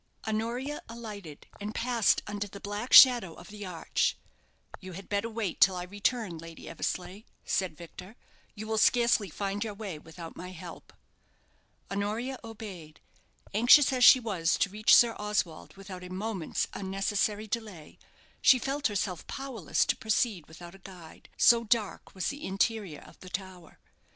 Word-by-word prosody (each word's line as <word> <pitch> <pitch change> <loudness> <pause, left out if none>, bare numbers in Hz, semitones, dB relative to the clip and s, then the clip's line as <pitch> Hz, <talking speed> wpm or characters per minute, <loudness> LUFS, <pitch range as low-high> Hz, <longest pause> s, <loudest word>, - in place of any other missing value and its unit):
Honoria 235 +7 -2
alighted, 210 -9 -9
and 210 +1 -6
passed 235 -2 +2
under 205 0 -4
the 200 0 -11
black 205 +5 -5
shadow 240 -10 +8
of 175 - -13
the 205 -1 -8
arch. 170 -3 -1 0.6
"You 185 -1 -10
had 195 +2 -10
better 205 +3 -1
wait 220 -5 -4
till 190 -1 +6
I 180 - -4
return, 205 -1 -2
Lady 165 0 -11
Eversleigh," 185 +3 -4 0.2
said 185 -5 -1
Victor. 180 +5 -11 0.4
"You 215 +1 -7
will 220 0 -1
scarcely 235 -3 +3
find 200 +5 -3
your 215 -2 -5
way 200 -7 -6
without 165 +1 -11
my 180 - -8
help." 165 - -11 1.0
Honoria 215 +6 -3
obeyed. 200 -9 -10 0.5
Anxious 245 +6 +6
as 250 -1 +1
she 255 - +9
was 190 -9 0
to 195 - 0
reach 215 +1 +5
Sir 235 -1 +5
Oswald 210 -6 -3
without 190 -2 -9
a 180 - -9
moment's 190 -2 -3
unnecessary 200 +2 -1
delay, 210 -8 -6 0.4
she 260 - +7
felt 275 +4 -1
herself 190 -4 -3
powerless 265 - -1
to - - +1
proceed 220 -5 -1
without 170 +2 -12
a 195 - -15
guide 180 -4 -13
so 235 -1 +6
dark 220 -4 -1
was 185 - -1
the 285 +1 -7
interior 195 -4 -1
of - - -17
the 185 - -11
tower. 185 -3 -8
205 Hz, 155 wpm, -29 LUFS, 185-225 Hz, 1.0 s, she